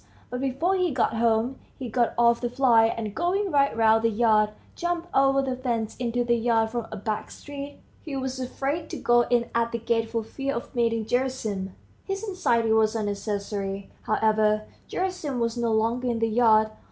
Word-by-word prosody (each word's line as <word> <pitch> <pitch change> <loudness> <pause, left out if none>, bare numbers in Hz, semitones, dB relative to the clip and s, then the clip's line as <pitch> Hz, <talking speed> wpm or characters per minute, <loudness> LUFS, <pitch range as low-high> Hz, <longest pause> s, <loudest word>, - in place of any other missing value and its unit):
But 250 +1 -3
before 275 +8 0
he 365 -1 +1
got 250 -5 0
home, 230 +3 +1 0.2
he 260 - -5
got 235 +1 0
off 235 0 +4
the 240 - -1
fly, 245 -3 +4
and 225 -2 -4
going 370 - 0
right 280 -4 +2
round 225 0 +4
the 230 - +4
yard, 215 -1 +3 0.3
jumped 345 0 -2
over 275 0 +4
the 260 -1 -2
fence 235 -4 -2
into 245 0 -1
the 240 0 +2
yard 225 -1 +2
from 235 -1 -3
a 215 - -5
back 210 +1 -3
street. 285 0 -8 0.2
He 295 -4 -6
was 265 -1 -3
afraid 275 +5 -3
to - - -5
go 240 0 +3
in 240 -1 +1
at 235 0 +1
the 235 - -1
gate 230 0 0
for 230 -1 -2
fear 275 +5 -4
of 235 - -6
meeting 230 -2 +1
Gerasim. 220 -7 -2 0.3
His 390 +1 -4
anxiety 235 - +1
was 220 0 +3
unnecessary, 200 -2 -3
however; 215 0 +2 0.3
Gerasim 365 -8 -2
was 230 0 0
no 235 -1 0
longer 230 +3 +1
in 235 -1 0
the 225 0 +1
yard. 220 -1 +4
235 Hz, 190 wpm, -26 LUFS, 220-265 Hz, 0.3 s, off